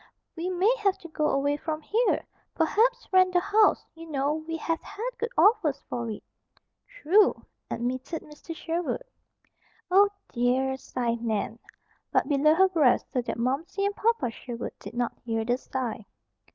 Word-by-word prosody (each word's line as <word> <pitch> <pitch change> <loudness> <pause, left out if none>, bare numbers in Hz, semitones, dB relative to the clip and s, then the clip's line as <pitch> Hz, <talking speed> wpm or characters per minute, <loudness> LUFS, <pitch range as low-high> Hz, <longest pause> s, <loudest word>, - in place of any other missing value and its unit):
We 345 +2 -3
may 370 +6 +3
have 395 -2 +2
to 335 - -9
go 305 -1 0
away 285 +1 +1
from 310 0 -3
here. 460 +8 +1 0.3
Perhaps 460 +9 +2
rent 370 -1 +5
the 355 - +5
house. 410 +3 +3
You 330 0 -11
know, 285 0 0
we 315 +1 -4
have 330 0 -2
had 470 +4 -5
good 465 +1 -1
offers 385 - +4
for 235 -1 -3
it." 215 - -6 0.6
"True," 425 -4 +3 0.2
admitted 255 +7 -3
Mr. 300 +2 -10
Sherwood. 335 +8 -2 0.9
"Oh, 400 +2 +6 0.2
dear!" 255 +2 +1
sighed 235 -3 -3
Nan, 220 0 -2 0.5
but - - +2
below 300 +2 +4
her 380 +2 +5
breath 305 -9 +3
so 250 - +1
that 240 - -4
Momsey 300 +12 -1
and 405 0 -1
Papa 435 - +1
Sherwood 235 0 -6
did - - -10
not 240 -1 -2
hear 225 -1 -1
the 245 +2 +1
sigh. 245 -6 -4
310 Hz, 160 wpm, -27 LUFS, 250-380 Hz, 0.9 s, Oh